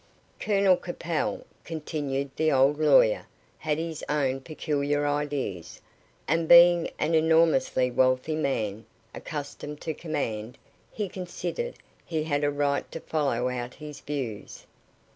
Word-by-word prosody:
"Colonel 195 Hz, -3 st, +3 dB
Capel," 175 Hz, -2 st, -3 dB, 0.2 s
continued 145 Hz, -4 st, -3 dB
the 155 Hz, 0 st, +2 dB
old 140 Hz, +2 st, +3 dB
lawyer, -, -, +4 dB, 0.3 s
"had 150 Hz, -1 st, -1 dB
his 160 Hz, -1 st, -4 dB
own 135 Hz, -3 st, 0 dB
peculiar 145 Hz, -1 st, -1 dB
ideas, 145 Hz, -, -3 dB, 0.5 s
and 165 Hz, +2 st, +1 dB
being 175 Hz, 0 st, +7 dB
an 155 Hz, +2 st, 0 dB
enormously 160 Hz, -5 st, +3 dB
wealthy 130 Hz, +4 st, +2 dB
man, 110 Hz, -8 st, -2 dB, 0.3 s
accustomed 150 Hz, -1 st, -6 dB
to 160 Hz, -, -3 dB
command, 125 Hz, -9 st, -4 dB, 0.3 s
he 210 Hz, -2 st, -3 dB
considered 190 Hz, -, -5 dB, 0.3 s
he 160 Hz, -2 st, -2 dB
had 145 Hz, -2 st, -1 dB
a 145 Hz, -, +3 dB
right 145 Hz, 0 st, -1 dB
to 165 Hz, -, -5 dB
follow 140 Hz, -7 st, -1 dB
out 125 Hz, -1 st, -4 dB
his 150 Hz, -1 st, -9 dB
views. 130 Hz, -8 st, -6 dB
150 Hz, 125 wpm, -27 LUFS, 135-165 Hz, 0.5 s, being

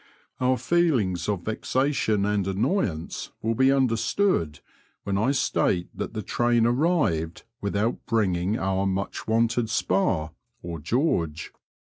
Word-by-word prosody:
Our 130 Hz, 0 st, +2 dB
feelings 120 Hz, -, +1 dB
of 100 Hz, -4 st, -1 dB
vexation 110 Hz, -2 st, 0 dB
and 105 Hz, -2 st, 0 dB
annoyance 95 Hz, -, -1 dB
will 115 Hz, +1 st, +1 dB
be 130 Hz, +4 st, +4 dB
under 130 Hz, -4 st, +2 dB
stood 95 Hz, -, 0 dB, 0.4 s
when 100 Hz, -1 st, -2 dB
I 110 Hz, +6 st, +2 dB
state 90 Hz, -9 st, +1 dB
that -, -, -5 dB
the 110 Hz, -, -3 dB
train 120 Hz, +2 st, +2 dB
arrived 120 Hz, -, +1 dB, 0.2 s
without 100 Hz, +4 st, -1 dB
bringing 100 Hz, -3 st, +1 dB
our 95 Hz, -1 st, 0 dB
much 95 Hz, +1 st, -3 dB
wanted 115 Hz, +1 st, +1 dB
spar 95 Hz, -7 st, 0 dB, 0.3 s
or 85 Hz, -1 st, -5 dB
George. 85 Hz, -, -1 dB
110 Hz, 125 wpm, -25 LUFS, 95-125 Hz, 0.4 s, be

